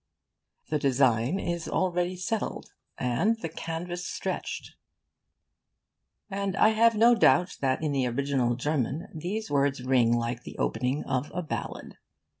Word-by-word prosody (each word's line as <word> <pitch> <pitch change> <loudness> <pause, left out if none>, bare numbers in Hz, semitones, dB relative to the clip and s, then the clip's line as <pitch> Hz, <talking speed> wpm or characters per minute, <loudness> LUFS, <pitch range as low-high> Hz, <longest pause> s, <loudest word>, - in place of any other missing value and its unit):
'The 150 - +2
design 130 - +2
is 170 -2 -3
already 180 -1 0
settled, 210 +5 -3 0.2
and 170 - +1
the - - 0
canvas 170 +2 -5
stretched'; - - -4 1.5
and 195 -1 -2
I 215 - +6
have 225 +1 +4
no 230 +3 +6
doubt 180 -5 +4
that 135 +2 0
in 150 - 0
the 135 -3 +1
original 130 -1 0
German 145 +2 -2
these 190 +7 -4
words 140 -2 +1
ring 125 -3 +3
like 120 0 0
the - - -10
opening 125 +5 -1
of 130 +2 -2
a 180 - -1
ballad. 155 - -6
150 Hz, 135 wpm, -28 LUFS, 130-180 Hz, 1.5 s, I